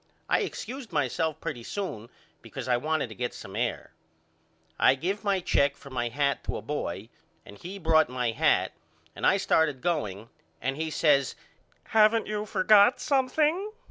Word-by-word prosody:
I - - +3
excused 260 -2 -5
myself 150 +2 -1
pretty 120 - -5
soon 115 - -5 0.3
because - - -8
I 125 - +3
wanted 155 +1 -1
to - - -8
get 120 +2 -4
some 95 +1 -9
air. 120 +1 -2 0.9
I - - +5
give 185 +9 -3
my 200 -2 +1
check 140 -5 +2
for 140 - -14
my 120 -2 -1
hat 140 +3 0
to - - -3
a - - -6
boy 110 -7 -4 0.4
and 100 - -12
he 185 +3 -7
brought 160 -5 +3
my 125 -2 -1
hat 115 - +2 0.4
and - - 0
I 195 - +4
started 160 -7 +2
going 115 - -2 0.3
and 135 +3 -2
he 160 +2 -3
says 145 -4 +2 0.5
Haven't 220 +1 +4
you 210 0 -3
forgot 205 +4 +5
something? 305 +9 +1
155 Hz, 165 wpm, -27 LUFS, 125-200 Hz, 0.9 s, I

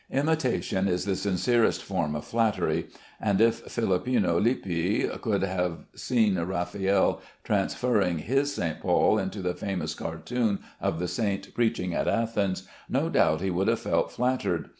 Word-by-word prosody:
Imitation 135 -9 0
is 90 -1 0
the 100 -1 0
sincerest 105 +5 +1
form 85 -6 -1
of 75 - -5
flattery, 115 -2 0 0.3
and 100 -3 +1
if 115 +1 +3
Philippino 100 -4 +1
Lippi 95 -5 0 0.2
could 100 -4 0
have 90 -3 -2
seen 110 -7 +1
Raffaelle 95 +3 0 0.2
transferring 100 -9 +1
his 135 - 0
St. 80 -2 -2
Paul 95 +4 +3
into 95 0 -4
the 90 0 0
famous 90 -6 -3
cartoon 100 +7 -2 0.2
of - - 0
the 90 +1 -2
saint 100 -1 -2
preaching 110 -7 0
at - - -1
Athens, 105 -5 0 0.3
no - - +1
doubt 80 +1 +3
he 95 0 0
would 95 +3 0
have 115 0 +1
felt - - 0
flattered. 130 +1 -1
100 Hz, 145 wpm, -27 LUFS, 90-115 Hz, 0.3 s, if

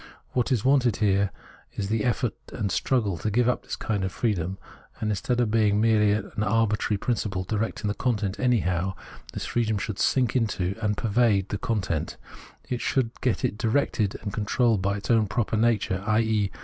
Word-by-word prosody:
What 125 +1 0
is 120 -4 +1
wanted 130 -5 +4
here 100 -2 +2 0.4
is 100 -1 -3
the 110 -1 0
effort 120 -2 0 0.2
and 105 -5 -2
struggle 105 -6 0
to 110 - -1
give 120 +3 +2
up 125 - +1
this - - -5
kind 105 -3 -2
of 95 - -1
freedom, 95 -4 -1 0.4
and 110 - -1
instead 120 +5 -1
of 120 -3 +1
being 110 -2 +3
a - - +2
merely 105 -1 +3 0.2
arbitrary 105 0 +1
principle 100 -4 -1
directing 105 +2 -2
the 105 - 0
content 105 -4 -1
anyhow, 95 -7 +1 0.4
this - - -4
freedom 110 -3 0
should 100 0 -4
sink 125 -3 +2
into 100 -6 0
and 105 -2 0
pervade 110 -4 +2
the 105 - -3
content, 100 -9 -2 0.6
should 125 -1 0
get 125 -3 +1
it 105 - -2
directed 110 -4 +1
and 100 -2 -4
controlled 110 0 +1
by 100 +2 0
its 100 - -3
own 110 -2 +4
proper 110 +1 -1
nature, 105 -4 +1
i.e. 110 -2 +2
105 Hz, 175 wpm, -26 LUFS, 100-115 Hz, 0.6 s, wanted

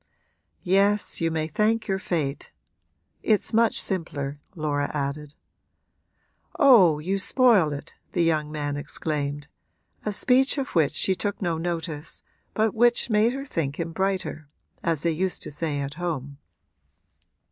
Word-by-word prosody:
'Yes, 200 +2 +2
you 165 - +2
may 160 -1 -1
thank 215 +7 0
your 195 -1 0
fate. 150 -7 -2 0.7
It's 215 +1 +1
much 230 0 +4
simpler,' 145 -6 -3 0.2
Laura 145 -3 -1
added. 145 +1 -4 1.2
'Oh, 200 - +6
you 190 +6 -2
spoil 215 - +4
it!' 145 -1 -7 0.2
the 175 - +2
young 155 -2 +1
man 145 -1 -3
exclaimed 145 -1 -3 0.6
a 210 - -1
speech 260 +7 +3
of 275 0 -2
which 155 -5 +2
she 190 - +2
took 205 +2 -3
no 170 -4 -1
notice 165 -2 -4 0.3
but 220 -1 +2
which 240 +1 +3
made 215 +3 +3
her 275 +1 -5
think 155 - -3
him 165 0 -3
brighter, 190 -4 -2 0.3
as 165 -3 -1
they 170 - +2
used 185 +3 -2
to - - -6
say 145 -1 -2
at 140 +1 -4
home. 150 -5 -4
165 Hz, 140 wpm, -25 LUFS, 150-205 Hz, 1.2 s, Oh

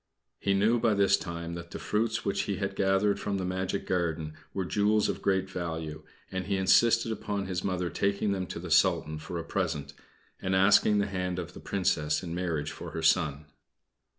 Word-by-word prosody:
He 100 -1 +1
knew 110 +5 +3
by 110 -2 +2
this 100 -1 +5
time 85 -2 -5
that 85 0 -7
the - - -6
fruits 110 +1 -1
which 100 - +1
he 100 - +1
had 100 +1 -3
gathered 95 +1 +2
from 100 -1 -2
the 95 - -2
magic 95 +1 -2
garden 80 -4 -1 0.2
were 95 -2 -2
jewels 105 +3 +2
of - - -3
great 95 -1 +1
value, 80 -4 -4 0.3
and 95 0 -3
he 100 -1 +1
insisted 115 +4 +4
upon 100 -2 -3
his 90 -1 -3
Mother 90 -2 -1
taking 100 +1 0
them 95 -2 -2
to - - -6
the 85 0 -6
Sultan 75 +1 +3
for 80 +3 -6
a 85 - -3
present, 85 -5 -2 0.5
and 95 0 0
asking 105 +2 +5
the 100 - +2
hand 90 -2 -2
of 90 -1 -5
the - - -10
Princess 75 -6 0
in 85 -2 -5
marriage 85 -4 -2
for - - -8
her 80 - -4
son. 80 -2 +2
95 Hz, 200 wpm, -29 LUFS, 85-100 Hz, 0.5 s, this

